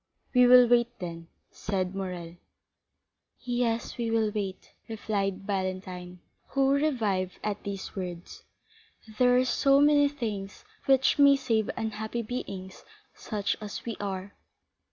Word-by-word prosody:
"We 250 -1 +6
will 250 0 +8
wait, 240 0 +2
then," 165 -2 -7 0.2
said 190 -2 -2
Morrel. 180 -3 -5 1.0
"Yes, 240 -1 -2
we 230 -1 -1
will 225 -2 +1
wait," 195 -3 -5 0.2
replied 200 -3 -2
Valentine, 185 -2 -4 0.3
who 270 0 +2
revived 220 -11 0
at 210 -1 -2
these 195 -1 -6
words; 180 -2 -6 0.8
"there 250 0 +5
are 255 - +3
so 275 +3 +3
many 290 0 +5
things 215 - -5 0.2
which 270 +2 +4
may 280 -1 +7
save 230 -6 0
unhappy 220 +1 -3
beings 195 -5 -6 0.3
such 205 -3 -2
as 210 -1 -7
we 230 -2 -3
are." 195 -1 -4
215 Hz, 125 wpm, -28 LUFS, 190-245 Hz, 1.0 s, will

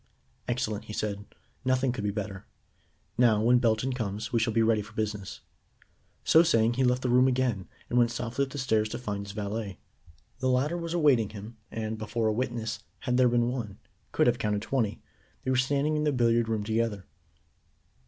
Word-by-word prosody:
"Excellent," 110 -4 -2
he 105 - -8
said. 105 -1 -3 0.4
"Nothing 130 0 +2
could 115 -4 -4
be 105 - 0
better. 100 -1 -5 0.7
Now, 115 -4 +5
when 120 +3 +4
Belton 120 +2 +1
comes, 110 -2 -4
we 115 - +3
shall 115 0 +1
be 115 +1 +3
ready 110 -1 +3
for 105 +2 -12
business." 105 -3 -3 0.8
So 160 - +6
saying 115 -8 +3
he 130 +2 +1
left 125 0 +2
the 125 - 0
room 125 +1 +5
again, 125 -7 0 0.2
and 125 - +2
went 120 -1 +4
softly 120 +4 -2
up - - -13
the 145 - -7
stairs 110 -5 +1
to - - -4
find 105 -4 -4
his 100 - -7
valet. 105 -1 -4 0.6
The 130 0 +1
latter 135 +6 +1
was 170 0 -3
awaiting 135 - +4
him, 110 +2 -9
and, 110 -1 -4
before 110 +1 -2
a 110 - +2
witness, 115 -1 -2 0.2
had 125 0 0
there 125 -1 +5
been 120 0 +2
one, 115 -6 -4 0.3
could - - +2
have 120 0 +2
counted 105 0 -1
twenty, 115 -4 -1 0.4
they 130 - 0
were - - +2
standing 140 +4 +1
in 150 - 0
the 150 - +2
billiard 120 -3 +2
room 110 -2 0
together. 110 -3 -1
115 Hz, 195 wpm, -28 LUFS, 105-125 Hz, 0.8 s, So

